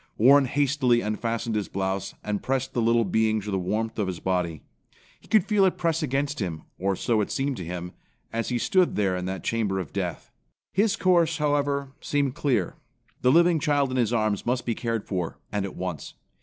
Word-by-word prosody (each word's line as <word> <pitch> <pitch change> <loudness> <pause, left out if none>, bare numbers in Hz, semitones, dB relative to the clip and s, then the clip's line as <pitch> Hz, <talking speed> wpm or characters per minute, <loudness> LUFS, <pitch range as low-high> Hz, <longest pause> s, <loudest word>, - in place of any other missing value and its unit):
Warren 135 +5 +6
hastily 135 -3 +2
unfastened 115 +1 -2
his 105 -2 -1
blouse, 95 0 -3
and 105 -1 -2
pressed 130 0 -1
the 120 - 0
little 115 0 +3
being 110 +3 +2
to 105 +1 -5
the 95 - 0
warmth 110 +5 -2
of 100 - 0
his 90 -2 -4
body. 90 -4 -1 0.6
He - - -21
could 215 -4 +4
feel 210 -2 +3
it 190 - +2
press 165 -1 0
against 145 0 -1
him, 85 -6 -3 0.2
or 95 +1 +1
so 110 +2 +1
it 105 - -2
seemed 140 -1 -1
to - - -5
him, 90 +1 -5 0.4
as 115 0 -1
he 125 - 0
stood 180 +8 +2
there 95 -3 +1
in 90 0 -3
that 95 0 -4
chamber 110 -4 0
of 85 -7 -6
death. - - -4 0.4
His 205 +2 +3
course, 170 -5 +3
however, 145 -2 0
seemed 140 -3 0
clear. 125 - 0 0.4
The 125 - +4
living 170 +1 +5
child 145 -3 +1
in 130 - -1
his 120 -3 +2
arms 110 -3 0
must 125 +1 -1
be 120 - 0
cared 115 -1 -2
for, 90 -4 -3
and 100 -1 -1
at 100 - -7
once. 90 -5 -5
115 Hz, 205 wpm, -26 LUFS, 100-140 Hz, 0.6 s, Warren